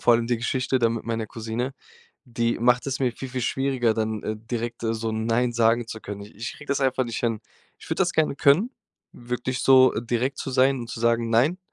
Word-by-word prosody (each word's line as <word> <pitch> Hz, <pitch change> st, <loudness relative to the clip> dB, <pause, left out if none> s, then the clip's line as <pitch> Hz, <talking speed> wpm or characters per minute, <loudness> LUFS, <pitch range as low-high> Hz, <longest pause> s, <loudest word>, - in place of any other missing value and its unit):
vor 120 Hz, -, +5 dB
allem 115 Hz, 0 st, +1 dB
die 120 Hz, 0 st, +1 dB
Geschichte 130 Hz, +2 st, 0 dB
da 115 Hz, -2 st, +3 dB
mit 115 Hz, -1 st, -4 dB
meiner 115 Hz, -1 st, -2 dB
Cousine, 115 Hz, +4 st, -4 dB, 0.5 s
die 115 Hz, -1 st, -1 dB
macht 120 Hz, +2 st, +3 dB
es 140 Hz, 0 st, -2 dB
mir 125 Hz, -2 st, +1 dB
viel, 135 Hz, +3 st, -7 dB
viel 130 Hz, 0 st, -4 dB
schwieriger, 130 Hz, -2 st, +1 dB
dann, 110 Hz, -1 st, -2 dB
äh, 110 Hz, -, -3 dB
direkt 115 Hz, +1 st, -4 dB
so 115 Hz, 0 st, -1 dB
„nein“ 115 Hz, +2 st, 0 dB
sagen 115 Hz, 0 st, +2 dB
zu 110 Hz, -1 st, -7 dB
können. 100 Hz, -1 st, -7 dB
I 105 Hz, -, -12 dB
ich 115 Hz, +4 st, -5 dB
kriege 145 Hz, -, -13 dB
das 140 Hz, -, 0 dB
einfach 130 Hz, -1 st, +1 dB
nicht 115 Hz, -1 st, -5 dB
an, 115 Hz, -2 st, 0 dB, 0.4 s
ich -, -, -14 dB
würde -, -, -1 dB
das -, -, +2 dB
gerne 155 Hz, -3 st, +1 dB
können, 155 Hz, -, +4 dB, 0.4 s
wirklich 125 Hz, +1 st, -4 dB
so 130 Hz, -1 st, +6 dB
direkt 120 Hz, +3 st, -1 dB
zu -, -, -4 dB
sein 130 Hz, +1 st, +3 dB
und 120 Hz, -, -7 dB
zu 115 Hz, -, -6 dB
sagen: 115 Hz, 0 st, +2 dB
„Nein!“ 130 Hz, +11 st, +3 dB
120 Hz, 225 wpm, -25 LUFS, 115-130 Hz, 0.5 s, so